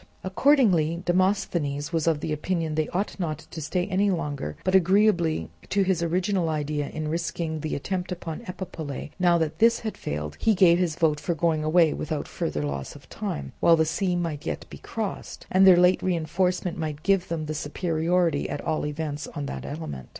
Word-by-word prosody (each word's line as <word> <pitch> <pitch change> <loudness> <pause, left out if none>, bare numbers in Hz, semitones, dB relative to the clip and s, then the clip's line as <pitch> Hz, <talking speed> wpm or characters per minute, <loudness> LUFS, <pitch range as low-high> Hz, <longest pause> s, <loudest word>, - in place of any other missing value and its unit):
Accordingly, 185 - +3
Demosthenes 175 -5 0
was 165 -1 0
of 160 -2 +1
opinion 160 +1 -1
that 155 - +2
they 155 - -4
ought 195 +3 -2
not 155 -5 -2
to 160 - -6
stay 180 +4 -1
any 200 +1 +1
longer; 145 - -3
but 185 - 0
agreeably 185 - +3 0.2
to 200 0 +2
his 185 -3 +1
original 180 +1 0
idea 150 -1 -2
in 155 -1 -4
risking 165 0 -2
the 155 +1 -3
attempt 185 +5 -3
upon 170 -1 -5
Epipolae, 165 -6 -6
now 175 -1 +4
that 160 -2 -2
this 230 +1 +4
had 220 -2 -4
failed, 75 0 -5
he 220 -2 +3
gave 175 -2 +5
his 175 -4 0
vote 155 -3 +2
for 165 +3 -2
going 160 -1 +1
away 160 0 +4
without 155 -1 -3
further 75 - -3
loss 70 -2 -4
of - - -14
time, 70 -1 -4
while 170 - +6
the 160 -1 +2
sea 180 +3 0
might 165 -4 -2
yet - - -4
be - - -9
crossed, 215 -4 -5
and 190 +1 +6
their 180 -2 +9
late 180 +1 +4
reinforcement 180 0 0
might 155 -1 -4
give 195 -2 +2
them 165 -2 -3
the 155 - -3
superiority 165 +3 0
at - - -3
all 155 - -1
events 150 -1 -4
on 145 - -3
that - - -6
element. 70 - -6
165 Hz, 190 wpm, -26 LUFS, 155-185 Hz, 0.2 s, their